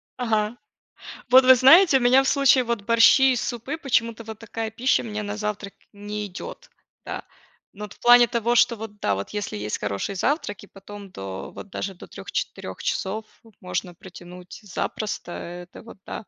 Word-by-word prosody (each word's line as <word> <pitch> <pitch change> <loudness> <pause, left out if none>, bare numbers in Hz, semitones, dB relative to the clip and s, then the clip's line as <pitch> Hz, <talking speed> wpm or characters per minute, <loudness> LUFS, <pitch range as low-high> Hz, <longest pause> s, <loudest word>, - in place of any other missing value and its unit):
Ага. 225 -2 -1 0.7
Вот 255 +1 +7
вы 260 0 +8
знаете, 285 +3 +7
у - - -6
меня 255 +2 +5
в 270 - -1
случае 275 -2 +4
вот 235 -3 -2
борщи 230 +4 +5
и - - -1
супы, 240 +6 -4
почему-то, 230 -6 -1
вот 220 -1 -9
такая 225 0 -5
пища 245 +4 +1
у - - -8
меня 215 -1 -4
на 205 +1 -5
завтрак 210 -1 -4 0.2
не 205 +1 -6
идет. 200 - -10 0.3
Да. - - -6 0.5
Но 210 +1 -8
вот 210 - -10
в - - -26
плане 240 -1 +7
того, 235 +1 0
что 235 -1 +4
вот 215 -1 -9
да, 100 -1 0
вот 100 - -6
если 205 - -4
есть 105 +1 -4
хороший 100 - -3
завтрак 205 - -2
и 205 - -14
потом 200 0 -12
до 95 - -7
вот 205 - -11
даже 195 0 -5
до - - -12
3-4 - - -6
часов 215 +2 -2 0.4
можно 180 -1 -4
протянуть 180 0 -12
запросто, 205 -1 -4
это 175 +1 -9
вот 230 -3 -14
да. - - -6
215 Hz, 185 wpm, -24 LUFS, 195-245 Hz, 0.7 s, вы